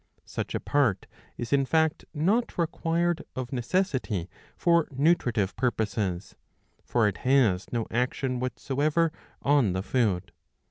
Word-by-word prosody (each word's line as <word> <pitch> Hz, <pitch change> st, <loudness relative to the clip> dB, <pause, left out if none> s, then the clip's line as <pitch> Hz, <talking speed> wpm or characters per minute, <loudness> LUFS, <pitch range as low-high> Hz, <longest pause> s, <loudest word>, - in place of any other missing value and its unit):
^ -, -, -38 dB
Such -, -, -4 dB
a -, -, 0 dB
part 135 Hz, -9 st, +1 dB, 0.3 s
is 120 Hz, +3 st, -3 dB
in 140 Hz, -1 st, +4 dB
fact 160 Hz, +3 st, +1 dB
not 200 Hz, +11 st, 0 dB
required 170 Hz, 0 st, 0 dB
of 130 Hz, +1 st, -4 dB
necessity 125 Hz, -, -1 dB, 0.3 s
for 170 Hz, -2 st, +3 dB
nutritive 130 Hz, -, +1 dB
purposes; 105 Hz, -6 st, -1 dB, 0.5 s
for 115 Hz, -3 st, +2 dB
it 100 Hz, -, -2 dB
has 120 Hz, -9 st, +2 dB
no 115 Hz, -2 st, -1 dB
action 125 Hz, +1 st, -1 dB
whatsoever 145 Hz, +6 st, 0 dB, 0.3 s
on 140 Hz, -9 st, +3 dB
the 95 Hz, +1 st, -2 dB
food. 105 Hz, -6 st, 0 dB
130 Hz, 130 wpm, -27 LUFS, 110-155 Hz, 0.5 s, in